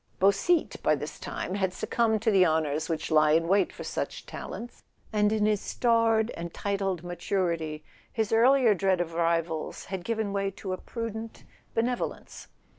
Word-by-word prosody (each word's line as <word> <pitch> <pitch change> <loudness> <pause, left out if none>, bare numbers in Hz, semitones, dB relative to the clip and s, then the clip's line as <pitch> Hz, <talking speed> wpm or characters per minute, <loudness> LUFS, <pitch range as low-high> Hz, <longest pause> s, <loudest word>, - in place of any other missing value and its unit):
Beausite, 200 - +2
by - - +3
this - - -7
time, - - -4
had 190 -2 0
succumbed 220 0 0
to 225 - +3
the 190 -2 +6
honours 155 -2 +1
which 160 0 -2
lie 155 -1 +5
in 165 +1 +3
wait 195 +3 +3
for - - -8
such - - -4
talents, 240 +1 -8 0.3
and 210 0 +3
in 215 -1 +2
his 210 -1 +2
starred 230 -1 +2
and 170 0 -6
titled 195 -3 -2
maturity 170 -4 -2 0.3
his 220 -2 -1
earlier 245 0 +5
dread 190 -1 +1
of 170 -1 -2
rivals 165 -1 -1
had 185 -2 -3
given 220 -1 -2
way 195 0 0
to 190 -1 -5
a - - -3
prudent 225 -1 -6 0.3
benevolence. 240 +2 -2
195 Hz, 165 wpm, -28 LUFS, 170-220 Hz, 0.3 s, the